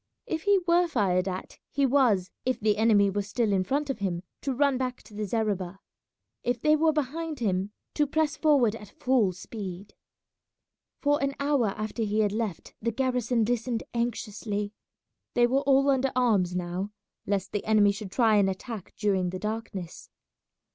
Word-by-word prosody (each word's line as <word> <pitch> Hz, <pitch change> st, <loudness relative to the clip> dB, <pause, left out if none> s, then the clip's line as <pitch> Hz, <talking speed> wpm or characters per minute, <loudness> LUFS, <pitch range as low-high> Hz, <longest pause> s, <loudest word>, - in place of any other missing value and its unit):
If 320 Hz, +1 st, -3 dB
he 405 Hz, -1 st, +5 dB
were 350 Hz, +1 st, +4 dB
fired 195 Hz, -, +1 dB
at, 185 Hz, 0 st, -5 dB
he 280 Hz, -1 st, +1 dB
was, 240 Hz, -9 st, +3 dB
if 255 Hz, 0 st, 0 dB
the 210 Hz, -1 st, +2 dB
enemy 210 Hz, -3 st, +4 dB
were 205 Hz, +1 st, 0 dB
still 210 Hz, +1 st, 0 dB
in 190 Hz, -1 st, +2 dB
front 285 Hz, +8 st, -1 dB
of 270 Hz, -4 st, -3 dB
him, 180 Hz, -3 st, -2 dB, 0.2 s
to 275 Hz, -, -1 dB
run 280 Hz, +1 st, +2 dB
back 255 Hz, -1 st, -3 dB
to 215 Hz, -, -16 dB
the 210 Hz, 0 st, -3 dB
zareba; 195 Hz, -4 st, -1 dB, 0.6 s
if 245 Hz, 0 st, -1 dB
they 305 Hz, +5 st, +4 dB
were 315 Hz, +1 st, +3 dB
behind 310 Hz, +2 st, -2 dB
him, 195 Hz, -4 st, -1 dB, 0.2 s
to 295 Hz, -1 st, +2 dB
press 310 Hz, +1 st, +1 dB
forward 280 Hz, -9 st, +3 dB
at 210 Hz, -3 st, -13 dB
full 250 Hz, -7 st, +3 dB
speed. 190 Hz, +1 st, -8 dB, 1.1 s
For 290 Hz, 0 st, +2 dB
an 275 Hz, 0 st, 0 dB
hour 280 Hz, -5 st, +2 dB
after 215 Hz, +2 st, -3 dB
he 215 Hz, 0 st, +1 dB
had 205 Hz, -2 st, +2 dB
left 215 Hz, -5 st, -3 dB
the 230 Hz, -, 0 dB
garrison 245 Hz, -2 st, +1 dB
listened 235 Hz, 0 st, -1 dB
anxiously. 210 Hz, -3 st, -2 dB, 0.6 s
They 240 Hz, -, +5 dB
were 265 Hz, +3 st, +2 dB
all 275 Hz, 0 st, +4 dB
under 270 Hz, 0 st, +1 dB
arms 205 Hz, -8 st, +2 dB
now, 180 Hz, +2 st, -2 dB, 0.4 s
lest 195 Hz, -1 st, -1 dB
the 205 Hz, -, -2 dB
enemy 210 Hz, -2 st, +5 dB
should 200 Hz, -1 st, -7 dB
try 225 Hz, -2 st, +4 dB
and 195 Hz, -1 st, +4 dB
attack 195 Hz, +1 st, -6 dB
during 190 Hz, -4 st, +1 dB
the 185 Hz, -, -4 dB
darkness. 210 Hz, -4 st, -5 dB
225 Hz, 175 wpm, -27 LUFS, 200-265 Hz, 1.1 s, he